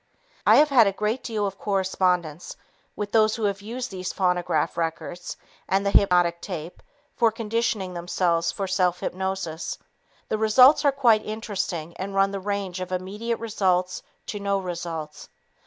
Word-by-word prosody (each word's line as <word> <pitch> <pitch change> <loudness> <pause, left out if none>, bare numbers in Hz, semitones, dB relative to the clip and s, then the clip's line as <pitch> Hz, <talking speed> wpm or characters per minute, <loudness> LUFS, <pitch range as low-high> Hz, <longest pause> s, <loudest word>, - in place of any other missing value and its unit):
I - - +8
have 300 0 +6
had 245 -6 +6
a - - +2
great 210 +5 -2
deal 215 -3 -2
of 195 -1 -5
correspondence 180 -4 0 0.4
with 205 -1 -4
those 215 -1 +4
who 225 - -5
have 200 -1 0
used 240 +4 -5
these 185 -1 -4
phonograph 180 -4 0
records 170 +1 -4 0.3
and 195 +1 +1
the 200 - +2
hypnotic 175 -4 +3
tape 175 -3 -7 0.3
for 230 -2 +3
conditioning 220 -4 -2
themselves 170 -1 0
for 195 - -3
self 180 -2 +1
hypnosis. 190 -3 -3 0.5
The 215 - -1
results 250 +8 +6
are 285 - +6
quite 240 -6 +3
interesting 195 -7 -4
and 195 +1 -5
run 195 0 +3
the 200 - -3
range 200 -2 -3
of 185 0 -5
immediate 205 +6 -3
results 185 -5 0 0.2
to 205 - -5
no 200 0 0
results. 170 -4 -6
195 Hz, 155 wpm, -25 LUFS, 180-215 Hz, 0.5 s, I